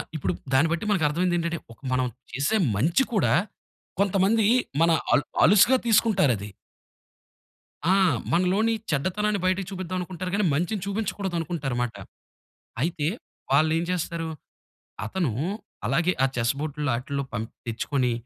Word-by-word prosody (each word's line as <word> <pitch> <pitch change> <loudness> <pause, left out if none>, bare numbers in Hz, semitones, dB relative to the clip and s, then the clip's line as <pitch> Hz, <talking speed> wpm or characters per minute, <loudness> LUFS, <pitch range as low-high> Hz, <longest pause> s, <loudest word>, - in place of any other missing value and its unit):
ఇప్పుడు 95 - -1 0.2
దాన్ని 150 +5 +4
బట్టి 170 +5 -1
మనకు 180 -6 +2
అర్ధమైందేంటంటే, 170 +1 0
ఒక - - -15
మనం 130 0 +2 0.3
చేసే 140 +11 0 0.2
మంచి 165 - +3
కూడా 205 - +3 0.7
కొంతమంది 200 +2 +3 0.4
మన 165 0 +5 0.2
అల్ 145 - +4 0.2
అలుసుగా 210 +8 +6
తీసుకుంటారది. 190 - +3 1.4
ఆ! - - +5 0.4
మనలోని 190 +6 +2 0.2
చెడ్డతనాన్ని 195 +7 0
బయటకు 185 0 +1
చూపిద్దామనుకుంటారు 185 -1 -4
గానీ 205 0 +2
మంచిని 180 +6 -1
చూపించకూడదనుకుంటారు 175 - -2
మాట. 120 -2 -3 0.9
అయితే 160 -2 -1 0.5
వాళ్ళేం 160 +3 +3
చేస్తారు. 170 -2 -2 0.8
అతను 165 - -1 0.6
అలాగే 175 +2 +2
ఆ - - +5
చెస్ 115 0 +2
బోర్టుల్లో 150 -2 -2
ఆటిల్లో 140 +2 -3
పంప్ 110 +2 -4 0.2
తెచ్చుకొని 125 +2 0
170 Hz, 115 wpm, -25 LUFS, 145-190 Hz, 1.4 s, అలుసుగా